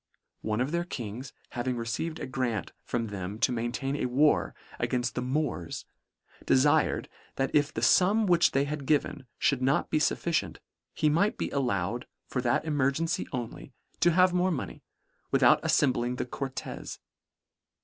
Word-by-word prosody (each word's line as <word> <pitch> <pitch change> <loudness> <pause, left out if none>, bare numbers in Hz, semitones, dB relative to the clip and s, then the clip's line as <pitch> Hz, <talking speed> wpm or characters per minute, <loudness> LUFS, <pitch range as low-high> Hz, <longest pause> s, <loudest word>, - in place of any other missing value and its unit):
One 110 +2 -1
of 130 +3 -1
their 170 0 0
Kings 125 -4 -6 0.2
having 125 0 -2
received 115 +8 -3
a - - -4
grant 125 - -2
from 115 -2 -2
them 100 0 -5
to 125 - +2
maintain 120 +4 -2
a 125 - -1
war 145 +5 +2 0.2
againft 125 -1 0
the 125 - -2
Moors, 130 - -2 0.6
defired, 135 +3 +3 0.3
that 135 0 -1
if 145 0 +3
the - - -4
fum 205 +4 +4
which 175 -3 +4
they 135 - +1
had 145 -1 -4
given, 145 -3 0 0.2
mould 135 -2 -2
not 135 +2 +1
be 155 - +3
fufficient, 170 +2 0 0.4
he 155 - +2
might 180 +8 +2
be - - -3
allowed 120 -4 -1 0.2
for 125 - -2
that 120 +5 +1
emergency 145 +1 0
only, 125 +1 -6 0.3
to 175 - +5
have 180 +1 +4
more 180 +1 +2
money, 160 -7 -4 0.5
without - - +5
aiTembling 125 -3 +1
the - - -2
Cortes. 135 +1 -6
135 Hz, 155 wpm, -28 LUFS, 120-155 Hz, 0.6 s, to